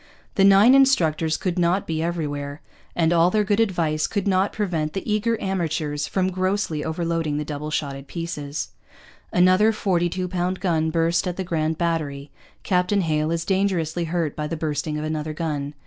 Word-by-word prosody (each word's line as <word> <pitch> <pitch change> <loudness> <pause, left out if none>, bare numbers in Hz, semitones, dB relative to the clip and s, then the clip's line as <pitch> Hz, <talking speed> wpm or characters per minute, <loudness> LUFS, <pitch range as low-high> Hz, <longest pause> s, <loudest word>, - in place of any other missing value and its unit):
The 195 - +3
nine 200 +5 +7
instructors 165 - +3
could 180 -1 -2
not 175 +3 +2
be 160 -1 -2
everywhere; 145 -4 -3 0.3
and 165 0 +2
all 170 +1 +4
their 210 +2 +2
good 205 +1 +1
advice 165 -8 +1
could 200 -2 -2
not 190 0 +2
prevent 165 -7 -2
the 195 - -5
eager 220 +2 0
amateurs 155 -6 -2
from 190 -1 0
grossly 185 -4 -1
overloading 165 -2 -1
the 150 - -3
double 150 0 -5
shotted 140 -2 -3
pieces. 150 -4 -5 0.6
'Another 185 +5 +4
42 185 -3 0
pound 180 +1 -2
gun 160 -4 +1
burst 165 +2 +1
at 180 - -3
the 190 - -2
Grand 160 -3 -1
Battery.' 150 -5 -2 0.3
'Captain 185 +1 +1
Hale 155 -2 0
is 165 0 -1
dangerously 180 -4 0
hurt 165 -2 -2
by 150 -1 -3
the 165 - -4
bursting 150 -1 -2
of 150 - -3
another 155 0 -3
gun. 150 -3 -3
170 Hz, 170 wpm, -23 LUFS, 155-185 Hz, 0.6 s, nine